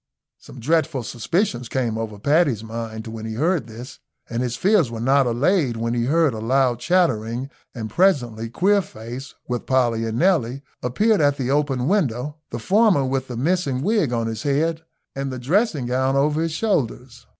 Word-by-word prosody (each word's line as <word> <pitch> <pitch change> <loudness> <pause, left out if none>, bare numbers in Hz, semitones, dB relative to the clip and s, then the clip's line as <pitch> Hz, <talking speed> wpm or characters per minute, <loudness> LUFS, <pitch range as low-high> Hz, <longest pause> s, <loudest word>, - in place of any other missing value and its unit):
Some 130 - -13
dreadful 145 0 0
suspicions 125 - -1
came 120 -4 -1
over 110 -2 -4
Paddy's 140 - +2
mind 110 -1 -6
when 110 -1 -7
he 110 0 -5
heard 155 -1 0
this, 120 +3 -10 0.3
and 115 0 -3
his 125 -1 -2
fears 185 - +3
were 115 -1 -6
not 135 +2 +3
allayed 130 - +1
when 115 +1 -1
he 120 -1 0
heard 155 0 +2
a 110 - -5
loud 125 +1 +1
chattering, 130 -8 0 0.2
and 110 -3 -4
presently 120 - +1
Queerface, 135 - -1
with 125 -1 -3
Polly 120 -4 +1
and 110 +1 -3
Nelly, 140 -7 +1 0.2
appeared 205 - +2
at 145 -1 +3
the 130 -1 -1
open 140 -3 0
window, 150 - 0
the 120 - -5
former 190 - +3
with 130 0 -1
the 125 - -6
missing 140 -2 0
wig 205 - +1
on 115 -1 0
his 110 0 -4
head 160 +4 0 0.3
and 135 0 -3
the 130 - -5
dressing 150 - +1
gown 130 +2 0
over 150 +3 +2
his 165 0 -1
shoulders. 130 - -2
130 Hz, 175 wpm, -22 LUFS, 115-160 Hz, 0.3 s, fears